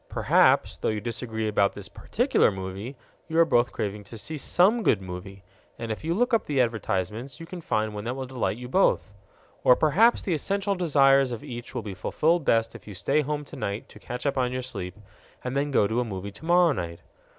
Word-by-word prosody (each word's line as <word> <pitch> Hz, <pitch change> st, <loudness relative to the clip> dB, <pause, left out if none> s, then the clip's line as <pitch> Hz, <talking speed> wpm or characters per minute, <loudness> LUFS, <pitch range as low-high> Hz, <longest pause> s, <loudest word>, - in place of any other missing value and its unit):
Perhaps, -, -, +3 dB
though -, -, -2 dB
you 110 Hz, -1 st, -1 dB
disagree 110 Hz, 0 st, -3 dB
about 100 Hz, -2 st, +2 dB
this -, -, -6 dB
particular -, -, +1 dB
movie, 95 Hz, +7 st, -6 dB, 0.3 s
you 165 Hz, 0 st, +4 dB
both 120 Hz, -6 st, +3 dB
are -, -, -20 dB
craving 105 Hz, 0 st, -4 dB
to 115 Hz, +3 st, -10 dB
see 155 Hz, +9 st, -5 dB
some 190 Hz, -, +3 dB
good 110 Hz, -, +3 dB
movie; 95 Hz, +1 st, -8 dB, 0.3 s
and 115 Hz, -1 st, -4 dB
if 110 Hz, -, -5 dB
you 165 Hz, +2 st, 0 dB
look 245 Hz, +4 st, +1 dB
up 230 Hz, -, +2 dB
the 145 Hz, -3 st, 0 dB
advertisements, 115 Hz, -, -1 dB
you 165 Hz, -, -7 dB
can 175 Hz, +1 st, -8 dB
find 110 Hz, -7 st, -1 dB
one 105 Hz, 0 st, -5 dB
that 120 Hz, +2 st, -2 dB
will 135 Hz, -1 st, -4 dB
delight 125 Hz, -4 st, -2 dB
you 125 Hz, 0 st, -7 dB
both. 130 Hz, -, +2 dB, 0.5 s
Or 125 Hz, -, +7 dB
perhaps 195 Hz, -, +4 dB
the 185 Hz, -, 0 dB
essential 200 Hz, +5 st, 0 dB
desires 140 Hz, -7 st, +4 dB
of 120 Hz, -, -5 dB
each 120 Hz, +1 st, -8 dB
will 120 Hz, -, -2 dB
be 100 Hz, -2 st, -5 dB
fulfilled 160 Hz, -, +1 dB
best 115 Hz, 0 st, +2 dB
if -, -, -13 dB
you 105 Hz, -, -8 dB
stay 140 Hz, +11 st, +1 dB
home 150 Hz, 0 st, -3 dB
tonight 100 Hz, -6 st, -5 dB
to -, -, -14 dB
catch 125 Hz, +2 st, -6 dB
up 140 Hz, -1 st, +1 dB
on 125 Hz, -1 st, +1 dB
your 130 Hz, 0 st, -3 dB
sleep, 100 Hz, -7 st, -6 dB, 0.5 s
and 125 Hz, +1 st, -3 dB
then 140 Hz, +1 st, 0 dB
go 130 Hz, -7 st, +3 dB
to 110 Hz, +4 st, 0 dB
a -, -, +2 dB
movie 100 Hz, -3 st, -6 dB
tomorrow 170 Hz, -, +3 dB
night. 85 Hz, -9 st, -4 dB
125 Hz, 215 wpm, -26 LUFS, 105-155 Hz, 0.5 s, Or